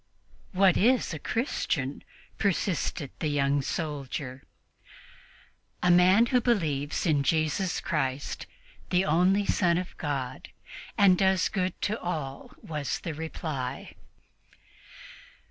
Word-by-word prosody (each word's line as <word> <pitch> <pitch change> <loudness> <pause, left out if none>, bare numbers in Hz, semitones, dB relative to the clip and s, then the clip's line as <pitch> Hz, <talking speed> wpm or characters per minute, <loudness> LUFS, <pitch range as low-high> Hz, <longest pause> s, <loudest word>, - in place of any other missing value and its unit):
"What 190 -1 +4
is 240 -2 +3
a 155 - -5
Christian?" 145 - -2 0.4
persisted 180 -6 -1
the 155 - -1
young 140 -1 +1
soldier. 135 -3 -4 1.4
"A 180 - +5
man 185 +6 +6
who 250 +1 +2
believes 155 - 0
in 150 -4 +3
Jesus 160 +5 0
Christ, 135 -3 -2 0.4
the 180 +1 +2
only 180 +6 +3
Son 175 -4 +2
of 180 0 -4
God, 135 -5 -4 0.5
and 190 -3 +5
does 190 -1 +3
good 185 -3 -2
to 215 +2 0
all," 150 -6 -5
was 150 -3 -3
the 165 - -4
reply. 150 -4 -5
160 Hz, 110 wpm, -28 LUFS, 145-190 Hz, 1.4 s, man